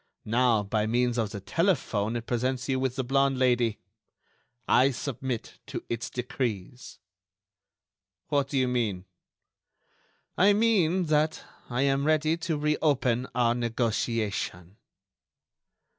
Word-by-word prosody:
Now, 115 -1 +2
by 105 +1 -1
means 120 +1 +1
of 110 -2 0
the 100 - -6
telephone, 120 - 0
it 115 -1 -4
presents 125 +1 -1
you 130 -2 0
with 130 -1 -1
the 130 - -1
blonde 135 +1 +2
Lady. 120 -4 +2 0.9
I 130 +2 +5
submit 130 -2 -5
to - - -5
its 115 0 -3
decrees." 125 -2 -4 1.3
"What 140 -2 +1
do 140 - -2
you 130 -1 +2
mean?" 110 -7 -1 1.3
"I 200 +2 +6
mean 195 -5 +3
that 155 0 +1 0.3
I 125 +2 0
am 140 0 +1
ready 155 +1 +2
to 165 -2 -2
re 150 +1 +1
open 130 -5 +1
our 120 -1 +3
negotiation." 115 -5 -2
125 Hz, 125 wpm, -27 LUFS, 115-140 Hz, 1.3 s, I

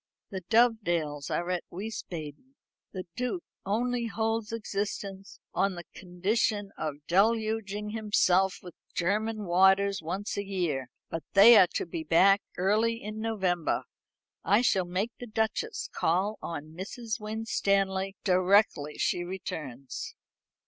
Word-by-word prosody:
The 190 -1 -4
Dovedales 175 - +2
are 175 +1 -1
at 180 -1 -1
Wiesbaden; 185 - -7 0.4
the 185 -2 -5
Duke 250 +8 -2 0.2
only 240 +3 0
holds 225 -1 -1
existence 200 -3 -4
on 195 -1 +1
the 175 - -7
condition 200 +3 -1
of 150 -1 -5
deluging 210 +1 +1
himself 195 -4 +2
with 180 -2 -10 0.2
German 210 +4 0
waters 190 +2 +4
once 190 +7 -4
a 200 - -1
year; 170 -10 -2 0.2
but 165 - -3
they 215 +4 +9
are 190 -4 +8
to - - 0
be 165 -1 -5
back 195 +6 +5 0.2
early 215 +5 +2
in 215 0 -6
November. 190 -7 0 0.6
I 205 +4 +4
shall 190 -7 +2
make 185 +6 -2
the 245 - -7
Duchess 220 - -2
call 195 +6 0
on 155 -2 -6
Mrs. 215 +6 -5
Winstanley 200 -3 0
directly 185 -5 +3
she 175 - 0
returns." 140 -8 -6
195 Hz, 125 wpm, -29 LUFS, 175-220 Hz, 0.6 s, they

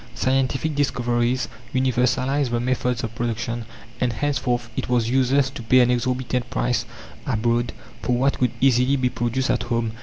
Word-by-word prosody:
Scientific 135 - 0
discoveries 125 -2 0 0.3
universalized 130 +2 +1
the 120 0 0
methods 125 -1 -1
of 115 -1 -4
production, 115 0 -3 0.3
and 125 -2 +1
henceforth 125 -2 -1
it - - -3
was 120 -2 +1
useless 130 +1 +3
to 135 - -8
pay 125 +3 +4
an 125 0 +4
exorbitant 125 0 -1
price 120 -1 0 0.4
abroad 120 -1 +1 0.3
for 125 - 0
what 135 +3 +1
could 125 - +3
easily 130 +1 +4
be 130 -2 +1
produced 120 +2 -1
at - - 0
home. 115 -2 -1
125 Hz, 155 wpm, -23 LUFS, 120-130 Hz, 0.4 s, pay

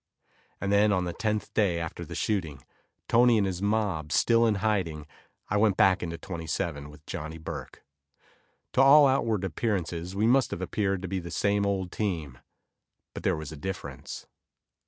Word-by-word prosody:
And 100 +1 -2
then 105 +1 +4
on 95 -2 +1
the 85 - -3
tenth 105 -1 -2
day 95 -6 +2
after 85 -1 -5
the - - -8
shooting, 80 - -2 0.4
Tony 120 0 +5
and 105 - +2
his 95 -1 -3
mob 100 -8 0
still 115 +7 +4
in 110 - +2
hiding, 95 -7 -1 0.4
I 105 - 0
went 105 -2 +3
back 95 0 +4
into 85 -1 -4
27 80 -4 -4
with 75 0 -16
Johnny 80 +2 -6
Burke. 80 - -8 0.9
To 130 - +4
all 140 +2 +8
outward 115 -7 +1
appearances 90 -2 -2
we 105 +2 +1
must 125 +1 +4
have 85 - -5
appeared 95 0 -1
to - - -3
be 95 +1 -2
the 85 -1 -8
same 100 +4 +1
old 95 -3 -1
team, 80 - -3 0.7
but - - -6
there - - +1
was 80 -1 -7
a - - -7
difference. 95 +6 -6
95 Hz, 175 wpm, -28 LUFS, 85-105 Hz, 0.9 s, all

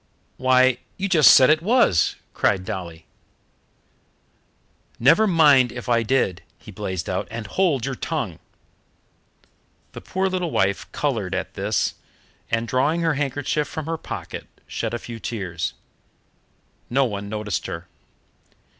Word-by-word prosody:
"Why, 130 -1 +4 0.2
you 195 - -1
just 165 -6 +6
said 135 0 +8
it 155 0 +3
was!" 195 - +3 0.2
cried 95 -1 +1
Dolly. 85 -4 -6 1.9
"Never 215 - +5
mind 145 - +5
if 125 0 -8
I 120 -1 +3
did," 115 -6 0 0.2
he - - -13
blazed 95 -2 -4
out; 95 - -2
"and 115 -1 -6
hold 140 - +1
your 135 - -2
tongue." 130 - -4 1.5
The - - -9
poor 190 +1 -1
little 185 -2 -1
wife 95 -7 0
coloured - - -2
at - - -4
this, - - 0 0.6
and, 115 +1 -1
drawing 145 +8 +1
her 165 -1 +2
handkerchief 145 +1 -1
from 160 - -6
her 165 +1 -2
pocket, - - -7 0.2
shed 115 0 -3
a - - -1
few 115 0 -8
tears. 95 -8 -4 1.1
No 135 +2 +3
one 100 -3 -4
noticed 105 -2 -3
her. - - -6
130 Hz, 135 wpm, -23 LUFS, 105-155 Hz, 1.9 s, said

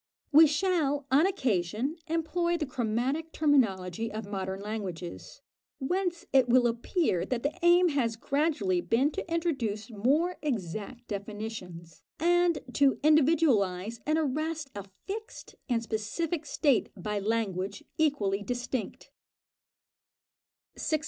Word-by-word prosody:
We 310 +2 +8
shall, 300 -3 +1
on 295 +7 +5
occasion, 240 - -1
employ 340 +1 0
the 310 - -2
chromatic 260 +6 -1
terminology 225 - +1
of 215 0 -5
modern 190 -1 -4
languages, 195 -5 -6 0.4
whence 350 +4 -2
it 260 -2 +5
will 250 0 +5
appear 235 - 0
that 235 +4 -2
the 285 +2 0
aim 350 +1 +5
has 245 -7 0
gradually 235 - 0
been 260 - +2
to 330 - -6
introduce 260 -11 -1
more 285 - +1
exact 235 - -4
definitions, 200 -5 -7 0.2
and 350 0 +3 0.2
to 280 -1 +4
individualise 255 - +3
and 310 +1 +2
arrest 310 0 -2
a 200 -1 -6 0.2
fixed 435 +3 -7 0.2
and 230 -2 +1
specific 285 +10 -3
state 280 -7 +2
by 210 +3 -2
language 200 +1 -2 0.2
equally 210 -11 +1
distinct. 245 +2 -4 1.7
610. 310 - 0
255 Hz, 115 wpm, -29 LUFS, 210-315 Hz, 1.7 s, We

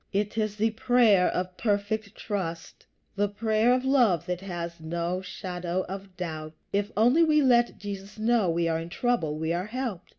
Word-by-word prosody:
It 205 +2 -1
is 215 -2 -1
the 220 +1 +1
prayer 225 -4 +4
of 180 0 -2
perfect 205 0 -1
trust 170 -6 -5 0.3
the 205 0 +2
prayer 220 +3 +2
of 255 +1 +2
love 235 - +3
that 180 0 -3
has 170 -3 -5
no 170 +3 -2
shadow 180 -1 -4
of 195 0 -8
doubt. 155 -3 -5 0.2
If 200 +2 0
only 245 +10 +5
we 305 -2 +4
let 240 -2 +3
Jesus 200 0 -7
know 220 -3 +2
we 170 0 +1
are 160 -1 0
in 165 +1 -6
trouble, 175 -8 0
we 160 +1 -1
are 180 +3 -2
helped. 235 -6 -4
200 Hz, 175 wpm, -27 LUFS, 175-225 Hz, 0.3 s, only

